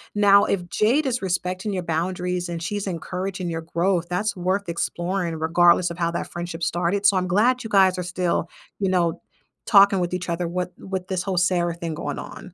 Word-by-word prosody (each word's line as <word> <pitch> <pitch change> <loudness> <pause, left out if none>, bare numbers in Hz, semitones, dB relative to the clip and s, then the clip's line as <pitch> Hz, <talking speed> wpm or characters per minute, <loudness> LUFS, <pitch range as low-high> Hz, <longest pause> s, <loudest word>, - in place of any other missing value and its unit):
Now, 200 -1 +6
if 180 -3 -1
Jade 235 - +2
is 250 -4 -1
respecting 185 +2 -2
your 180 -2 -2
boundaries 180 +1 -2
and 170 -1 -4
she's 205 +4 -3
encouraging 180 +1 -4
your 165 0 -3
growth, 170 +1 0
that's 205 +4 -1
worth 185 +2 -1
exploring 175 0 -2
regardless 175 +2 +4
of 170 - -7
how 170 0 +1
that 170 - -4
friendship 175 -1 -5
started, 175 +5 0
so 200 - +6
I'm 185 0 0
glad 235 +8 +2
you 225 - -6
guys 190 -2 +4
are 180 - -2
still, 180 -1 -1 0.3
you 195 -2 +1
know, 175 -2 +1 0.4
talking 200 -2 +6
with 175 0 -2
each 180 -1 -3
other 170 0 -1
what 180 +1 -3
with 190 -1 -5
this 185 -2 -2
whole 190 -2 -2
Sarah 175 -1 +2
thing 170 -2 -4
going 155 - -4
on. 185 -3 -10
180 Hz, 200 wpm, -23 LUFS, 170-195 Hz, 0.4 s, Now